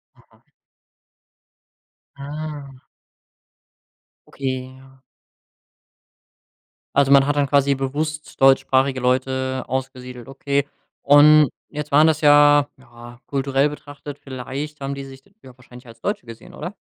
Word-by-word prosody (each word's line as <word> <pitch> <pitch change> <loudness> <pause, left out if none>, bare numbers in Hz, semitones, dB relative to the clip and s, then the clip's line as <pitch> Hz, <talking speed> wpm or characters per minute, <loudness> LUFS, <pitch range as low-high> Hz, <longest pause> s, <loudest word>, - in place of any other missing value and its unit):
Mhm. - - -28 1.7
Ah. 145 -2 -8 1.5
Okay, 130 -1 -5
ja. 135 0 -20 1.9
Also, 140 -1 +3
man 140 0 +6
hat 145 - 0
dann 145 -1 +1
quasi 140 0 +2
bewusst 155 +3 -4
deutschsprachige 135 0 +3
Leute 130 +1 -1
ausgesiedelt, 125 -2 -6
okay. 140 +1 -2 0.3
Und 150 0 +6 0.2
jetzt 150 0 -7
waren 150 +3 +5
das 155 -1 +1
ja, 145 -1 +5
ja 120 -2 -15
kulturell 135 +1 0
betrachtet, 145 -1 -10
vielleicht 140 +3 -7
haben 135 0 -4
die 140 - -7
sich 135 0 -13 0.2
ja 130 -2 -15
wahrscheinlich 125 0 -16
als 115 0 -15
Deutsche - - -3
gesehen, 115 -1 -13
oder? - - -7
135 Hz, 115 wpm, -21 LUFS, 130-145 Hz, 1.9 s, man